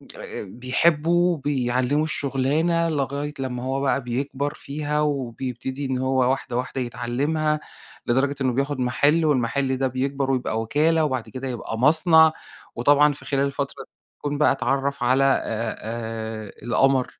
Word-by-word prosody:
أ - - -7
أ - - -6
بيحبه، 160 - +1
بيعلّمه 135 0 0
الشُغلانة، 155 +4 0
لغاية 145 0 -2
لمّا 125 -2 -3
هو 135 +1 -1
بقى 140 -1 +1
بيكبر 140 +4 -2
فيها 150 +1 -3
وبيبتدي 130 -1 -3
إن 130 -1 -1
هو 130 -1 +2
واحدة، 130 -2 -3
واحدة 130 +1 -3
يتعلّمها، 145 +6 -1 0.5
لدرجة 135 +4 +1
إنه 130 -2 +1
بياخد 140 +1 -1
مَحِل 145 +6 +2
والمَحِل 130 -1 +1
ده 135 0 +1
بيكبر 135 +1 -1
ويبقى 120 -3 -1
وِكالة 155 +7 +2
وبعد 130 -5 -3
كده 130 +1 -6
يبقى 115 -2 -5
مصنع. 160 +3 +6 0.4
وطبعًا 145 +4 +4
في 145 - -11
خلال 140 -1 +1
الفترة 140 0 -4 0.3
يكون 145 0 -3
بقى 150 - +4
أتعرّف 140 0 -1
على 130 +3 +3
أ 115 -3 -2
أ - - -16
القمر 130 +2 +2
135 Hz, 145 wpm, -23 LUFS, 125-145 Hz, 0.5 s, مصنع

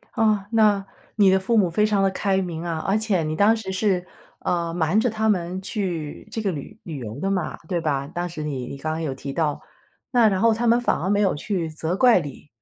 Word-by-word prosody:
哦， 215 -4 +2
那 210 -3 +3 0.3
你 200 -3 +5
的 190 - +4
父 225 +4 +1
母 190 -4 +4
非 210 +5 +3
常 205 -2 +2
地 195 - +4
开 190 0 0
明 170 -3 -4
啊。 170 -2 -2
而 195 +5 0
且 210 -6 +1
你 155 0 -2
当 210 +4 +4
时 190 -3 -5
是， 190 -2 0 0.4
嗯， 170 -1 -1
瞒 175 +4 +2
着 235 +2 +2
他 220 0 -1
们 185 -3 0
去 180 -7 -4
这 - - -3
个 200 -3 0
旅 175 +8 -8
旅 160 -4 -6
游 110 -2 -7
的 195 +1 -1
嘛， 185 -5 -2
对 175 -2 -1
吧， 140 -3 -1
当 175 +3 -3
时 155 -2 -6
你 135 -4 -3
你 - - -7
刚 155 +3 -3
刚 160 +1 -3
有 145 -4 -2
提 135 +1 -6
到。 150 -2 0 0.6
那 225 -3 +6
然 190 - 0
后 230 +2 +4
他 235 +2 -1
们 235 +1 +5
反 245 - +1
而 185 - -1
没 205 0 +2
有 195 - +3
去 175 +1 -2
责 160 +3 -2
怪 245 -2 +6
你， 145 0 -9
190 Hz, 260 characters per minute, -23 LUFS, 160-210 Hz, 0.6 s, 那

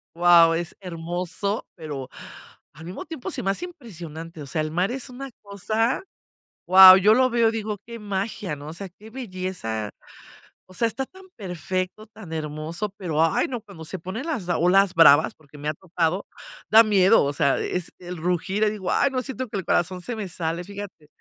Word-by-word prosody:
guau, 170 -1 +6
es 170 0 -4
hermoso, 180 +3 -3
pero 145 -6 -6 0.6
al 165 +2 -12
mismo 180 - -7
tiempo 315 -6 -6
se - - -2
me 195 - +2
hace 350 - -3
impresionante, 165 - -9
o 140 - -8
sea, 155 +3 -1
el 155 0 -3
mar 180 +5 +1
es 265 +1 -4
una 270 +2 -7
cosa, 215 - -1 0.7
guau, 185 0 +11
yo 210 +3 +5
lo 255 +2 +4
veo 230 -1 +3
y - - -2
digo: 215 -2 -3
"Qué 235 0 -8
magia", 200 -4 -3
¿no?, 145 +1 -10
o 160 - -7
sea, 195 +2 -7
qué 210 +5 -15
belleza. 185 - -4 0.8
O 185 - -16
sea, 230 +5 +1
está 265 +4 -3
tan 380 +6 -16
perfecto, 185 +2 -4
tan 205 -6 -11
hermoso, 155 +5 -3
pero 165 -5 0
ay, 165 - +2
no, 245 -3 -4
cuando 195 -7 -12
se 185 +2 -5
ponen 190 - -6
las 270 - -3
olas 180 +3 +3
bravas, 160 -2 +6
porque 150 -1 -17
me 145 +1 -6
ha 155 - -1
tocado, 175 +2 -2 0.4
da 220 +1 +9
miedo, 205 -2 +5
o 140 - -1
sea, 140 -1 +2
es 180 -2 -3
el 180 0 -7
rugir, 180 +5 -1
ahí 210 - +3
digo: 190 -4 -4
"Ay, 280 - +2
no, 255 -1 -1
siento 260 -1 -5
que 205 - -4
el 190 - -4
corazón 180 +1 0
se 235 +6 -5
me 210 -3 -4
sale", 165 +1 -3
fíjate. 200 -5 -9
185 Hz, 200 wpm, -24 LUFS, 165-215 Hz, 0.8 s, guau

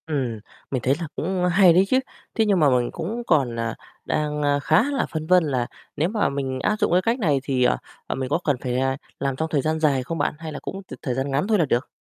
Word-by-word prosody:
Ừm. 130 -8 -2 0.3
Mình 130 -3 -1
thấy 130 +3 +2
là 165 - -3
cũng 180 +2 -1
hay 180 -1 +6
đấy 185 +3 +5
chứ, 260 - +4 0.4
thế 225 - +3
nhưng 200 -3 +3
mà 150 -3 +5
mình 125 -2 +1
cũng 210 +9 -4
còn, 135 -7 +2
à, 115 -1 -2 0.3
đang, 150 0 -1
a, 145 -1 +2
khá 155 +7 +3
là 280 - 0
phân 155 -1 -4
vân 180 0 +5
là 130 -5 -1 0.3
nếu 155 +4 +1
mà 215 0 +1
mình 135 -2 -3
áp 210 - +1
dụng - - +1
cái 180 +1 +4
cách 230 +6 0
này 150 - +2
thì, 130 -2 +1
à, 60 - +3 0.3
à, - - -2
mình 130 -1 -3
có 145 - +1
cần 145 - +2
phải, 125 -1 -1
à, 130 0 0 0.2
làm 135 -1 -1
trong 160 +4 -2
thời 150 -3 +1
gian 155 +2 -1
dài 140 -4 +2
không 165 +6 -4
bạn, 145 - 0
hay 160 -1 -6
là 150 - -6
cũng 195 - -6
t 185 - -11
thời 125 - -2
gian 135 +2 -2
ngắn 140 +8 0
thôi 215 -1 +3
là 165 - +4
được? 125 -1 0
150 Hz, 275 wpm, -23 LUFS, 130-175 Hz, 0.4 s, hay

